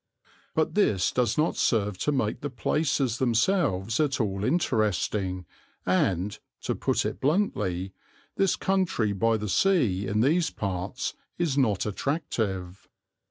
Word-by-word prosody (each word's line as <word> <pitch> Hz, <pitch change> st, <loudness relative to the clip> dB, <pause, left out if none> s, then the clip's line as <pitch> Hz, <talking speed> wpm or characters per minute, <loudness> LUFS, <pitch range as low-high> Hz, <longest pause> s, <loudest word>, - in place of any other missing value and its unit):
But 160 Hz, -, +1 dB
this 105 Hz, -, +2 dB
does 125 Hz, -2 st, +1 dB
not 155 Hz, +2 st, +2 dB
serve 105 Hz, -5 st, +1 dB
to 150 Hz, -, +1 dB
make 120 Hz, -7 st, -1 dB
the 145 Hz, -, -3 dB
places 135 Hz, 0 st, 0 dB
themselves 115 Hz, -, +1 dB
at 145 Hz, -3 st, +1 dB
all 100 Hz, -3 st, -1 dB
interesting 105 Hz, -, 0 dB, 0.4 s
and, 95 Hz, +1 st, +1 dB, 0.2 s
to -, -, -1 dB
put -, -, 0 dB
it 90 Hz, -, -4 dB
bluntly, 100 Hz, -, 0 dB, 0.4 s
this 195 Hz, -2 st, +2 dB
country 185 Hz, -, 0 dB
by 115 Hz, +3 st, +2 dB
the 105 Hz, 0 st, -4 dB
sea 105 Hz, -, +2 dB
in 105 Hz, +2 st, +1 dB
these 160 Hz, +7 st, +3 dB
parts 100 Hz, +4 st, -3 dB, 0.2 s
is 170 Hz, -6 st, 0 dB
not 115 Hz, -8 st, +2 dB
attractive. 105 Hz, -, -3 dB
110 Hz, 130 wpm, -27 LUFS, 95-145 Hz, 0.4 s, these